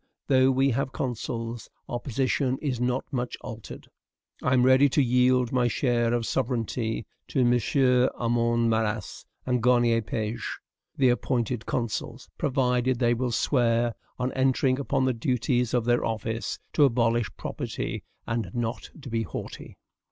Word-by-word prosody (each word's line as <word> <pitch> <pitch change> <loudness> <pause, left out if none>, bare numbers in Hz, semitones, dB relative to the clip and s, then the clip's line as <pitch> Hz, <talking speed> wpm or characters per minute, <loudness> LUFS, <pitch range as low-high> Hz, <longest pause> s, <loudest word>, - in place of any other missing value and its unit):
Though 130 -1 +4
we 135 +1 +3
have 130 +2 -1
consuls, 115 -2 -4 0.2
our 120 - -3
position 130 +1 0
is 135 -6 -2
not 125 +1 0
much 125 -1 -2
altered. 115 -1 -9 0.5
I 125 - +1
am 125 -1 +4
ready 130 +2 +6
to 140 +2 +3
yield 125 0 +3
my 125 -1 +2
share 120 -1 +1
of 120 -1 -1
sovereignty 115 -3 -1 0.2
to 130 - +1
MM. 125 +1 +3
Armand 115 0 +1
Marrast 110 -1 -2 0.2
and 125 -2 +1
Garnier 120 -1 +3
Pages, 110 +1 -3 0.5
the 130 -2 +4
appointed 120 -1 -1
consuls, 115 -3 -3
provided 125 -2 +1
they 120 -1 +3
will 125 +1 -1
swear 120 -1 +2 0.2
on 125 +1 -1
entering 130 0 +2
upon 135 -1 0
the 130 - +2
duties 125 -1 0
of 120 -2 +1
their 120 0 +2
office, 110 -4 -3 0.2
to 150 - +4
abolish 120 -4 +2
property - - -4 0.2
and 115 -4 -2
not 120 0 -3 0.2
be 115 -2 -1
haughty. 110 - -7
120 Hz, 145 wpm, -26 LUFS, 115-130 Hz, 0.5 s, ready